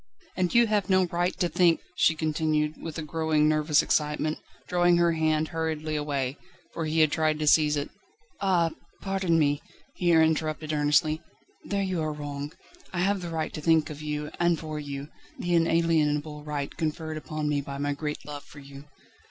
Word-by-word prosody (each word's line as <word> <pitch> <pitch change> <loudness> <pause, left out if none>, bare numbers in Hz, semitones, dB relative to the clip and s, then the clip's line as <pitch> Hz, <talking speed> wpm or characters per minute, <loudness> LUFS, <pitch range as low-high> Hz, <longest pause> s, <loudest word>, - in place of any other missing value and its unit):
"And 180 -2 0
you 235 0 +7
have 210 -4 0
no 185 -1 +4
right 175 +1 -1
to 180 - +2
think 170 0 +3
..." 180 - -35
she 160 - +5
continued, 155 -1 0
with 165 -1 -6
a 160 - -3
growing, 155 -1 +1
nervous 155 -1 +3
excitement, 150 +1 0 0.3
drawing 175 -1 +3
her 170 0 +4
hand 155 -1 +1
hurriedly 160 -1 -2
away, 140 -3 -2 0.4
for 165 - -3
he 160 +1 +2
had 155 -2 +4
tried 155 -1 +1
to 155 - -2
seize 150 0 +4
it. 145 - -3 0.5
"Ah! 175 -4 +2 0.3
pardon 195 -4 +1
me," 145 -2 +2 0.3
he 175 -1 +1
interrupted 160 -1 +2
earnestly, 150 +1 +2 0.4
"there 200 -1 -1
you 185 -3 -1
are 155 -1 -1
wrong. 145 -1 -5 0.4
I 175 - -2
have 195 +1 +1
the 175 - -5
right 160 -1 -3
to 155 - -5
think 160 0 +3
of 150 0 -8
you 150 0 -4
and 175 -1 +3
for 155 -1 -5
you 140 0 -6 0.3
the 175 - -2
inalienable 160 -3 +2
right 145 -2 -4
conferred 155 0 -3
upon 155 -1 -4
me 145 -1 +1
by 140 0 -7
my 145 +1 -1
great 150 -1 -5
love 145 -1 -7
for 145 - -16
you." 140 0 -11
155 Hz, 185 wpm, -27 LUFS, 150-170 Hz, 0.5 s, you